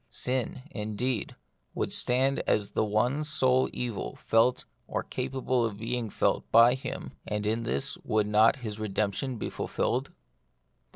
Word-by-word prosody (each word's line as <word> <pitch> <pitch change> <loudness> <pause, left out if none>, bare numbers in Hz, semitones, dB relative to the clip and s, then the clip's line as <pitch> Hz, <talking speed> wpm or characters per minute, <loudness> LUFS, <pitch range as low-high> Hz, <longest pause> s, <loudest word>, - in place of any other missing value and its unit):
Sin, 125 0 -2
indeed, 110 +1 -2 0.4
would - - -1
stand 130 +2 +2
as 105 -1 +1
the - - +1
one 120 +8 +1
sole 130 -4 +2
evil 115 - -4
felt 115 +3 +2 0.2
or - - -2
capable 130 -1 -1
of 110 -3 -2
being 115 +1 -2
felt - - 0
by 115 +2 +7
him, 130 - -5 0.2
and 105 0 -2
in 110 +2 0
this 70 -12 -2
would 105 -1 +1
not 105 +2 +5
his 105 -1 -4
redemption 110 +4 -1
be - - -3
fulfilled 130 +3 -1
115 Hz, 140 wpm, -28 LUFS, 105-130 Hz, 0.4 s, by